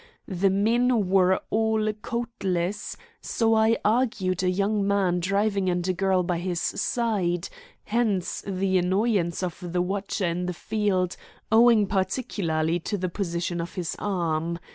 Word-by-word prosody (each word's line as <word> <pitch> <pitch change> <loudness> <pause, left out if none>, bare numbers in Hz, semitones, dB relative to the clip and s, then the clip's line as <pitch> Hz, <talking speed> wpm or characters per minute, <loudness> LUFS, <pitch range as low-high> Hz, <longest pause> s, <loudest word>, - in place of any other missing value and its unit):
The 190 +1 +1
men 225 +1 +2
were 190 -1 +4
all 220 -1 +1
coatless, 210 -5 -3 0.2
so 225 -1 +1
I 220 +1 +4
argued 215 -5 +1
a 185 - +1
young 200 +2 0
man 190 -3 +2
driving 200 +1 +1
and 175 0 -1
a 185 - +1
girl 190 0 +1
by 175 -1 -1
his 175 -1 -2
side, 190 -6 -1 0.3
hence 210 -6 -1
the 190 -1 +1
annoyance 185 -1 +1
of 175 -2 -4
the 175 0 -2
watcher 195 +1 -2
in 175 +1 -1
the 180 - -3
field, 195 -3 -1 0.3
owing 225 -1 +6
particularly 185 -5 -1
to 205 +5 -3
the 185 -1 -2
position 170 -2 -2
of 170 - -7
his 175 -3 -3
arm. 170 -4 -1
190 Hz, 140 wpm, -25 LUFS, 180-215 Hz, 0.3 s, owing